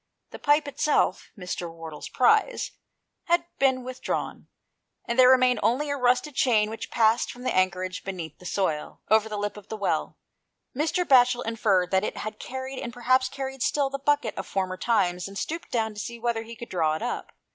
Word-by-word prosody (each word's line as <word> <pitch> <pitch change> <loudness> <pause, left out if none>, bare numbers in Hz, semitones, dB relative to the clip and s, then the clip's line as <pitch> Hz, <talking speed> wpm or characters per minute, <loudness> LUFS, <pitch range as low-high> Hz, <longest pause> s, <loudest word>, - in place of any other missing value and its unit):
The - - -9
pipe 295 0 +3
itself, 285 +1 +1
Mr. 180 -2 -5
Wardle's 165 -2 -8
prize, 435 - +2 0.5
had 345 -1 +2
been 265 -2 +3
with 255 0 -8
drawn, - - -3 0.6
and 235 +2 -2
there 255 0 +8
remained 255 -2 +5
only 260 +7 +1
a - - 0
rusted 255 +3 +2
chain 220 -5 +2
^^h 225 +1 -6
passed 225 0 +2
from 245 - -11
some - - 0
anchorage 185 0 0
beneath 175 -6 -6
the 180 - -8
soil, 160 -7 -2
over 220 0 +4
the 210 - -4
lip 205 0 -3
of 210 0 -13
the 220 - -4
well. 200 - -1 0.6
Mr. 325 +6 0
Batchel 245 -3 +5
inferred 205 -5 +1
that 190 0 +3
it - - -3
had 215 0 -5
carried, 260 +1 -6
and 235 - -5
perhaps 255 +2 +2
carried 270 -1 -6
still, 280 0 +1
the 275 - -3
bucket 290 -4 +1
of - - -5
former 185 -1 -2
times, 185 -4 +1
and 195 0 -8
stooped 330 - -4
down 220 -2 -1
to 210 - -8
see 235 +2 -5
whether 235 -1 -1
he 230 +1 -9
could 235 +1 -9
draw 160 -4 +1
it 160 - -5
up. - - -4
235 Hz, 200 wpm, -26 LUFS, 195-260 Hz, 0.6 s, there